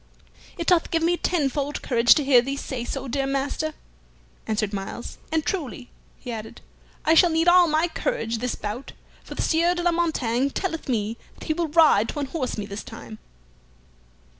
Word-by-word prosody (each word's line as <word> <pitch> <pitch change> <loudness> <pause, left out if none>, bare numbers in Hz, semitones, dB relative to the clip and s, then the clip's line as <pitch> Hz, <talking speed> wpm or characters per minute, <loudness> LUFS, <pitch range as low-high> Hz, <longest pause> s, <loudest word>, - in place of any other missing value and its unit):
"It 335 - -3
doth 350 -2 +3
give 330 -1 0
me 345 +1 +3
tenfold 290 -5 -1
courage 240 -2 +5
to 300 - +1
hear 265 -3 +6
thee 275 +3 -4
so 260 -3 -4
say, 270 +2 -5
dear 270 +2 -1
master," 280 +3 -2 0.7
answered 215 -1 -1
Myles. 195 +4 -6
"And 320 -1 0
truly," 280 -9 -4 0.3
he 250 - -7
added, 220 -1 -7 0.5
"I 315 - +5
shall 345 +2 +6
need 325 +1 +1
all 350 0 +7
my 315 +2 +2
courage 330 - -2
this 250 +1 -2
bout, 215 +6 -6 0.3
for - - -9
the - - -1
Sieur 340 +2 +2
de 350 - -3
la 350 - +3
Montaigne 280 -7 0
telleth 325 -1 -4
me 225 -1 -1 0.2
that - - -12
he 315 - 0
will 335 +1 -1
ride 300 -9 +4
to - - -4
unhorse 275 -3 -3
me 210 - -3
this 200 +1 -7
time." 225 -1 -10
280 Hz, 185 wpm, -24 LUFS, 235-330 Hz, 0.7 s, all